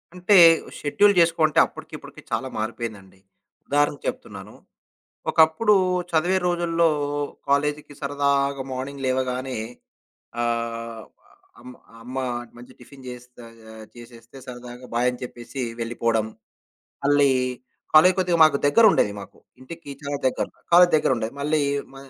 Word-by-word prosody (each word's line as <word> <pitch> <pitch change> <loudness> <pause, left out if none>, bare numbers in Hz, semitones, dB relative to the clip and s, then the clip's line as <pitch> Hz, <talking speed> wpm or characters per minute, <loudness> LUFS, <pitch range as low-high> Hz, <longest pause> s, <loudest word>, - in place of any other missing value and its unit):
అంటే, 180 +3 +2 0.4
షెడ్యూల్ 200 +8 +3
చేసుకోవంటే 165 -2 +3
అప్పటికి - - -12
ఇప్పటికి - - -13
చాలా 130 - -2
మారిపోయిందండి. 110 -4 -6 0.5
ఉదాహరణకు 145 0 0
చెప్తున్నాను. 100 0 -7 0.8
ఒకప్పుడు 160 +7 +4 0.4
చదివే 175 +4 +2
రోజుల్లో 170 -1 +1 0.6
కాలేజీకి 145 +1 -1
సరదాగా 140 -1 0
మార్నింగ్ 135 +1 -6
లేవగానే 130 0 -2 0.9
ఆహ్, 115 -1 -3 0.6
అమ్మ, 125 - -11 0.3
అమ్మ 125 +2 -9 0.4
మంచి 125 +2 -14
టిఫిను 135 +2 -15
చేస్త 125 0 -12 0.4
ఆహ్, 110 0 -11
చేసేస్తే 120 +1 -14
సరదాగా 125 0 -10
బాయని 125 +1 0
చెప్పేసి 125 +2 -8 0.2
వెళ్ళిపోవడం. 115 -1 -1 0.8
మళ్ళీ 145 0 +4 0.6
కాలేజు 180 +4 +7
కొద్దిగా 180 -2 +1
మాకు 155 -3 +3
దగ్గరుండేది 200 - +4
మాకు. - - -13 0.2
ఇంటికి 150 +3 -11
చాలా 145 0 -4
దగ్గర, 130 - -1 0.3
కాలేజు 175 +1 +7
దగ్గరుండేది. 125 -4 -1
మళ్ళీ 150 +1 +1 0.3
మ - - -13
135 Hz, 110 wpm, -23 LUFS, 120-155 Hz, 0.9 s, కాలేజు